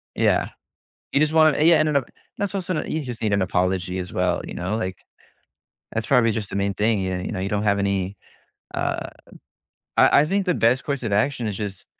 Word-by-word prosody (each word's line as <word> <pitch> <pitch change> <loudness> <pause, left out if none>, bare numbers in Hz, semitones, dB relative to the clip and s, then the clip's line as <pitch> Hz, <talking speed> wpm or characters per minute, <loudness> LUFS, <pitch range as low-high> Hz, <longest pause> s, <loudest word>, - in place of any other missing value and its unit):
Yeah, - - +2 0.6
you 140 - +3
just 155 0 +2
wanna 155 -2 +5
Yeah, 165 0 +6
and 155 - +2
then 145 - +1
o 130 - -4 0.3
that's 205 0 -2
also 185 -2 -2
n - - -4
you 155 -1 -1
just 120 -4 -7
need 105 -2 +1
an 100 -1 +2
apology 90 0 0
as 90 0 -5
well, 90 -1 0
you - - -7
know, 95 +5 -2
like, 95 -4 -3 1.0
that's 115 0 -2
probably 115 -2 +4
just 105 -3 -4
the - - -4
main 100 0 0
thing, 105 +1 +1
y 95 -1 -2
you - - -4
know, 95 - -3
you 95 - -2
don't 105 0 -1
have 100 -1 +2
any, 100 -1 -1 0.6
uh - - -2 0.9
I 140 - +6
I - - +2
think 195 +4 0
the 180 - +2
best 125 +2 +2
course 140 -2 -3
of 110 - -2
action 115 +2 +1
is 100 - -3
just 100 -3 -6
110 Hz, 225 wpm, -23 LUFS, 95-140 Hz, 1.0 s, Yeah